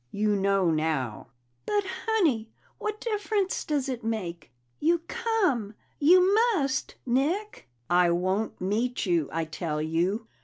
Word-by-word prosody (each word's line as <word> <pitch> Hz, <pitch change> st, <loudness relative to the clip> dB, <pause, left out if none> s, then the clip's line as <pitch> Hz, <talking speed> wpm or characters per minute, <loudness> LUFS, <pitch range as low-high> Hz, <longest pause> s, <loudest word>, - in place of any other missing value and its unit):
You 210 Hz, +6 st, +1 dB
know 195 Hz, -3 st, +2 dB
now." 155 Hz, -9 st, -1 dB, 0.4 s
"But, 415 Hz, -1 st, +1 dB, 0.2 s
Honey, 310 Hz, -, +2 dB, 0.3 s
what 425 Hz, 0 st, -3 dB
difference 415 Hz, -3 st, -1 dB
does 285 Hz, -3 st, -1 dB
it 250 Hz, -3 st, -4 dB
make? 180 Hz, -, -4 dB, 0.3 s
You 330 Hz, +2 st, +2 dB
come. 295 Hz, -, 0 dB, 0.2 s
You 365 Hz, +6 st, +6 dB, 0.2 s
must, 275 Hz, -6 st, -1 dB
Nick!" 300 Hz, -, -1 dB, 0.2 s
"I 175 Hz, 0 st, +4 dB
won't 185 Hz, +5 st, 0 dB
meet 225 Hz, +7 st, -1 dB
you, 170 Hz, -5 st, +1 dB
I 165 Hz, 0 st, -1 dB
tell 155 Hz, 0 st, -3 dB
you!" 175 Hz, +8 st, 0 dB
220 Hz, 125 wpm, -27 LUFS, -, 0.4 s, You